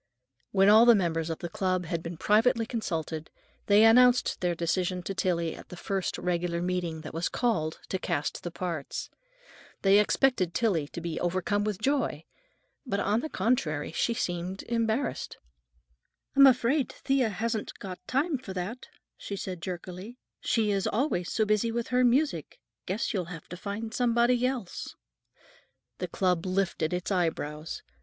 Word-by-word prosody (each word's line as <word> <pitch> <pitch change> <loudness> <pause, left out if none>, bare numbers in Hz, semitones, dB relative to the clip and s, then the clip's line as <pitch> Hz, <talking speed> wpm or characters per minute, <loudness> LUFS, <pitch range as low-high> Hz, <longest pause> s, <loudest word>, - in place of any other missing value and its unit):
When 195 0 +4
all 220 +3 +8
the 235 - +9
members 165 -4 0
of 165 - -2
the 175 - -5
club 185 0 -1
had 165 -1 -2
been 170 0 -6
privately 225 +4 +3
consulted, 165 -9 -3 0.4
they 205 +1 +6
announced 245 +2 +5
their 175 -1 +1
decision 180 +2 -1
to 195 - -3
Tillie 170 -3 0
at - - -13
the 180 - -9
first 195 +1 -2
regular 175 -1 -1
meeting 175 -2 -2
that 155 - -8
was 165 +2 -1
called 170 -11 0
to 190 - -1
cast 145 -4 -2
the 175 - -4
parts. 170 -4 -4 0.7
They 195 +1 +6
expected 210 -5 +2
Tillie 180 -11 +1
to 170 - -7
be 165 -1 -3
overcome 185 +4 0
with 210 -2 -1
joy, 245 - 0 0.6
but, 220 -8 -2
on 205 +2 +1
the 315 - -4
contrary, 175 - 0
she 230 +7 0
seemed 180 0 -3
embarrassed. 230 +3 -1 1.0
"I'm 275 0 +9
afraid 255 +2 +3
Thea 270 -4 +1
hasn't 220 +2 -3
got 185 -2 -7
time 280 +2 0
for 215 -7 -8
that," 195 +8 -5 0.3
she 200 - -6
said 185 -3 -5
jerkily. 185 +5 -6 0.2
"She 220 -3 +1
is 195 -1 0
always 215 - 0
so 220 - +2
busy 215 +2 +1
with 235 0 -3
her 250 0 +3
music. 245 - +1 0.3
Guess 200 +6 -1
you'll 185 -4 -1
have 165 -2 -9
to 180 - -6
get 210 +4 -5
somebody 240 +1 +3
else." 250 -8 -5 1.0
The 180 - -2
club 180 0 0
lifted 185 -4 0
its 180 +2 -2
eyebrows. 160 -4 -2
195 Hz, 160 wpm, -28 LUFS, 175-230 Hz, 1.0 s, the